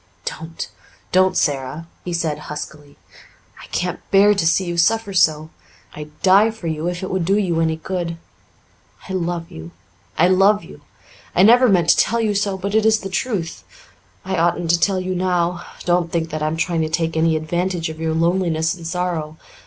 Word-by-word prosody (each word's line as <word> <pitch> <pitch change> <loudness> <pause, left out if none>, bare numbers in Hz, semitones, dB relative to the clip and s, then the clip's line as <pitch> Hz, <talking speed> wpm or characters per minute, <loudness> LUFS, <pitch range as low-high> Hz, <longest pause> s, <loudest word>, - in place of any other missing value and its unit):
"Don't 160 +1 -6 0.4
don't, 185 0 +3
Sara," 140 +3 -1 0.2
he 180 - -5
said 165 -3 -1
huskily. 150 -1 -8 0.6
"I - - -12
can't 180 0 -2
bear 200 +2 +5
to 185 -5 0
see 185 +3 +2
you 175 -1 -3
suffer 205 +4 +1
so. 155 -3 +2 0.4
I'd 150 0 -10
die 200 +4 +6
for 220 -5 -10
you 160 0 -2
if 180 +1 -3
it 185 - -4
would 185 -2 0
do 195 +4 +2
you 175 -5 0
any 160 -1 +1
good. 170 0 -4 0.9
I 190 - -5
love 170 -2 -3
you 80 +1 -9 0.5
I 175 - +5
love 195 +3 +4
you! - - -13 0.5
I 180 - +5
never 245 +4 +6
meant 175 -4 +3
to - - +6
tell 235 - +2
you 220 -2 +1
so, 200 -1 -1
but 200 +2 -4
it 220 0 +3
is 220 0 +3
the 195 - -5
truth. 190 -5 -3 0.6
I 190 0 -2
oughtn't 170 0 +1
to 170 - +2
tell 190 +1 +1
you 185 0 -3
now. 180 -1 0 0.2
Don't 175 -1 +1
think 165 -1 -2
that 155 0 -4
I'm 155 +1 -1
trying 165 0 0
to 155 - -1
take 165 0 -1
any 160 0 +2
advantage 175 +2 -2
of 160 0 -8
your 160 0 -1
loneliness 165 -1 +1
and 170 -3 -8
sorrow. 165 -3 -3
175 Hz, 190 wpm, -20 LUFS, 160-190 Hz, 0.9 s, die